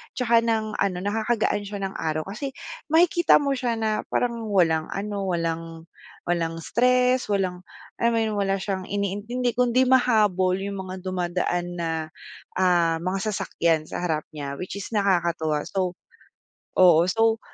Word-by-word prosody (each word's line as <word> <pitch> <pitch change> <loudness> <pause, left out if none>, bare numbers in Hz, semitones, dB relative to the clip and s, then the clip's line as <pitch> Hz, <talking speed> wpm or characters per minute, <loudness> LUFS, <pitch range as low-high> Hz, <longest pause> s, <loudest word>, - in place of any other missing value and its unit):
'tsaka 235 -2 +3
ng 220 -2 -1
ano 195 -2 +1
nakakagaan 220 +1 0
siya 205 -1 -5
ng 195 - -2
araw 155 -1 -1
kasi 240 - -6 0.3
makikita 345 +2 +4
mo 285 -1 +2
siya 250 -3 -1
na 220 -1 0
parang 235 -2 -1
walang 165 -6 +2
ano, 200 -1 -3
walang 165 -2 -3 0.4
walang 170 -2 -1
stress, 250 +3 +2
walang 190 -3 -1 0.4
alam 235 0 +2
mo - - +2
'yon, - - -3
wala 195 -1 +1
siyang 190 -1 -4
iniintindi 205 +5 -2
kundi 250 +1 +2
mahabol 215 -8 +3
'yong 195 +1 -4
mga 185 - -5
dumadaan 175 -1 -1
na, 170 -1 -2 0.7
ah, 175 -3 +3
mga 185 +2 -1
sasakyan 170 -6 0
sa 155 - -6
harap 160 -3 -1
niya, 140 -2 -5
which 185 +6 -6
is 195 - -6
nakakatuwa. 170 -6 +1
So 185 -2 -2 0.8
oo, 175 -2 +6
so, 225 +4 +2
195 Hz, 145 wpm, -24 LUFS, 175-230 Hz, 0.8 s, oo